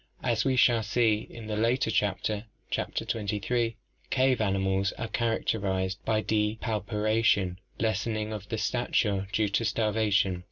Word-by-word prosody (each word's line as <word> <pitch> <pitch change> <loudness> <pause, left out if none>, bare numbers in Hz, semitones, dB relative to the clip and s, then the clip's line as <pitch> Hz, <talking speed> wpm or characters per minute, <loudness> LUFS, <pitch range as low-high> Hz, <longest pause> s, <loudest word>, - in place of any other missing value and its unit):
As 115 -3 +1
we 135 -1 +2
shall 120 -2 +5
see 110 0 +1
in 115 -2 -9
a - - -1
later 115 +2 +1
chapter 105 +2 0 0.3
(Chapter - - -2
XXIII), 115 +2 -1 0.3
cave 130 -2 +2
animals 95 -1 +1
are 110 - -4
characterized 100 -4 -1
by 110 -1 +2
depauperation, 105 -2 +1 0.2
lessening 110 -1 -1
of 100 -2 -6
stature 100 -2 0
due 105 -1 +1
to 100 +4 +1
starva 110 -1 +1
tion. 95 -3 +2
110 Hz, 130 wpm, -28 LUFS, 100-115 Hz, 0.3 s, shall